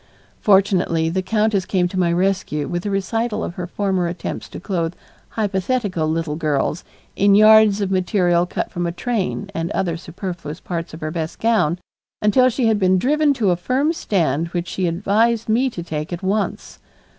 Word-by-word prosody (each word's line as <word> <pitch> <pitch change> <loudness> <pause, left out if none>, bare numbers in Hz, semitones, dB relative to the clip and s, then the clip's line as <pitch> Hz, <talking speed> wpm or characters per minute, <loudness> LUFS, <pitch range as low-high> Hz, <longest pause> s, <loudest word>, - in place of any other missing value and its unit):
Fortunately 185 -5 +3
the 185 +3 -1
countess 210 +1 +1
came 180 -1 +1
to 185 - -3
my 175 -2 +2
rescue 180 -4 0
with 175 +3 -3
a - - 0
recital 215 +3 -1
of - - -4
her 180 0 -5
former 190 -2 -1
attempts 170 +1 -5
to - - -8
clothe 175 -2 -2 0.3
hypothetical 200 -4 -1
little 160 -1 -1
girls 155 +1 -1 0.3
in 200 0 +4
yards 215 -1 +6
of 195 -1 -1
material 180 -2 +2
cut - - -3
from 175 0 -2
a - - -2
train 200 0 -3
and 165 -2 -2
other 170 -3 -1
superfluous 170 -2 -7
parts 170 -3 -5
of 160 - -12
her 155 0 -3
best 160 -1 -4
gown 215 -8 +2 0.4
until 250 +5 +4
she 255 0 -1
had 220 -2 +3
been 185 -1 +3
driven 295 +8 +2
to 215 -7 +2
a - - +3
firm 260 - 0
stand 165 - 0
which 175 0 -4
she 185 -2 -1
advised 210 +6 +1
me 240 +5 +2
to 175 -8 -7
take 155 -1 -5
at 175 +1 -5
once. 200 +2 -2
185 Hz, 180 wpm, -20 LUFS, 170-210 Hz, 0.4 s, yards